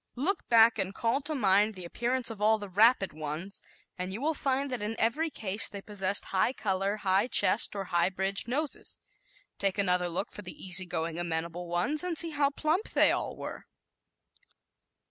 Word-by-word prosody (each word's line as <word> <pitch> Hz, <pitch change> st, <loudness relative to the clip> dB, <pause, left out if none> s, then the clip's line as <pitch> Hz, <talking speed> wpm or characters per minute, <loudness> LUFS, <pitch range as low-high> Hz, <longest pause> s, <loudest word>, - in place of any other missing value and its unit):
Look 315 Hz, +11 st, -1 dB
back 230 Hz, -1 st, +5 dB
and 195 Hz, 0 st, -3 dB
call 235 Hz, +4 st, 0 dB
to 305 Hz, +2 st, -3 dB
mind 210 Hz, -2 st, +3 dB
the 185 Hz, -2 st, -7 dB
appearance 240 Hz, +6 st, 0 dB
of 210 Hz, -2 st, -9 dB
all 220 Hz, +1 st, +4 dB
the 205 Hz, -1 st, -7 dB
"rapid" 210 Hz, +1 st, +4 dB
ones 155 Hz, +6 st, -6 dB, 0.4 s
and 185 Hz, +1 st, -3 dB
you 200 Hz, -, -5 dB
will 310 Hz, +4 st, 0 dB
find 275 Hz, -1 st, -1 dB
that 250 Hz, -4 st, -3 dB
in 210 Hz, +2 st, -3 dB
every 300 Hz, +9 st, +1 dB
case 210 Hz, -6 st, +2 dB
they 200 Hz, -, -7 dB
possessed 200 Hz, -1 st, 0 dB
high 195 Hz, +6 st, +1 dB
color, 195 Hz, -2 st, -1 dB
high 195 Hz, +2 st, +1 dB
chests 225 Hz, -3 st, +3 dB
or 200 Hz, -, -3 dB
high 175 Hz, -1 st, +1 dB
bridged 195 Hz, +3 st, -2 dB
noses. 290 Hz, +4 st, -3 dB, 0.6 s
Take 195 Hz, 0 st, 0 dB
another 180 Hz, -3 st, +1 dB
look 175 Hz, +4 st, -4 dB
for -, -, -9 dB
the 185 Hz, -3 st, -9 dB
easy 185 Hz, 0 st, +2 dB
going 165 Hz, -1 st, -3 dB
amenable 170 Hz, +1 st, -3 dB
ones, 180 Hz, -, +1 dB
and 355 Hz, -3 st, -3 dB
see 330 Hz, 0 st, +2 dB
how 285 Hz, -2 st, +2 dB
plump 315 Hz, +8 st, -1 dB
they -, -, +4 dB
all -, -, -2 dB
were! -, -, -8 dB
205 Hz, 185 wpm, -29 LUFS, 185-250 Hz, 0.6 s, back